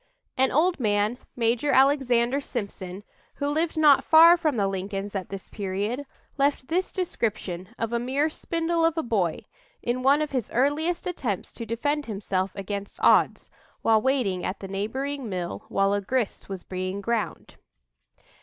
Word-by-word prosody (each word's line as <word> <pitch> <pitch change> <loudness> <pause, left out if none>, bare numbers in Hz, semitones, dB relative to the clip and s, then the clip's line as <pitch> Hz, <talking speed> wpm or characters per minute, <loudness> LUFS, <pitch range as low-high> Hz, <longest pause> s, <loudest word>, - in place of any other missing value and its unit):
An 265 0 +3
old 340 +5 +2
man, 210 +1 +1 0.2
Major 235 +4 +1
Alexander 265 -1 +3
Sympson, 200 -6 -6 0.3
who 285 - -2
lived 315 +3 0
not 300 -3 +6
far 330 +2 +8
from 310 -7 0
the 200 -2 +2
Lincolns 195 +1 -4
at 190 -2 -3
this 195 -1 -7
period, 205 +7 -3 0.3
left 275 -2 +1
this 365 +3 0
description 205 - -3
of 230 0 -2
"a 235 - +1
mere 265 +5 +1
spindle 330 +1 -1
of 330 0 +2
a 320 - 0
boy," 195 - -1 0.4
in 245 +1 -1
one 280 +4 +4
of 300 - -5
his 255 -6 -2
earliest 295 +7 0
attempts 250 - -3
to 230 - -7
defend 290 +6 -1
himself 195 -3 -1
against 200 0 -5
odds, - - +3 0.3
while 220 -1 +4
waiting 245 -9 0
at 185 +2 -3
the 195 - -7
neighboring 255 +7 -3
mill 180 -3 -4
while 195 0 +2
a 205 - 0
grist 230 0 -2
was 190 -2 -6
being 185 +1 -4
ground. 225 +2 -3
235 Hz, 160 wpm, -26 LUFS, 200-285 Hz, 0.4 s, far